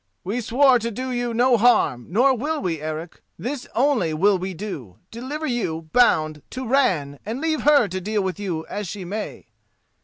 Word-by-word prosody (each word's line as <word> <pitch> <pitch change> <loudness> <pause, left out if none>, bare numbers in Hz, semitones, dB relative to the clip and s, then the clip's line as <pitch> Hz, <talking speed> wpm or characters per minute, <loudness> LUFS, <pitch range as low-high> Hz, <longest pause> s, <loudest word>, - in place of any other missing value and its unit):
"We 220 +7 -2
swore 255 +2 +4
to 230 +1 -2
do 255 +4 -4
you 245 -1 -1
no 240 +1 +3
harm, 205 - +3
nor 255 +8 +4
will 300 +6 -2
we, 165 - -2
Eric; 155 +2 -6 0.2
this 260 +2 -5
only 245 - +2
will 195 +4 +3
we 185 0 -4
do: 145 - -7
deliver 265 +7 -5
you, 165 - -3
bound, 155 -11 +3
to 260 0 -5
Ran, 170 - +1
and 225 +5 -4
leave 315 0 0
her 290 -6 +5
to 185 +1 -4
deal 210 +1 -1
with 190 +1 -3
you 175 -6 -3
as 205 -2 -5
she 190 +1 -6
may." 210 +4 -5
215 Hz, 185 wpm, -23 LUFS, 175-255 Hz, 0.2 s, her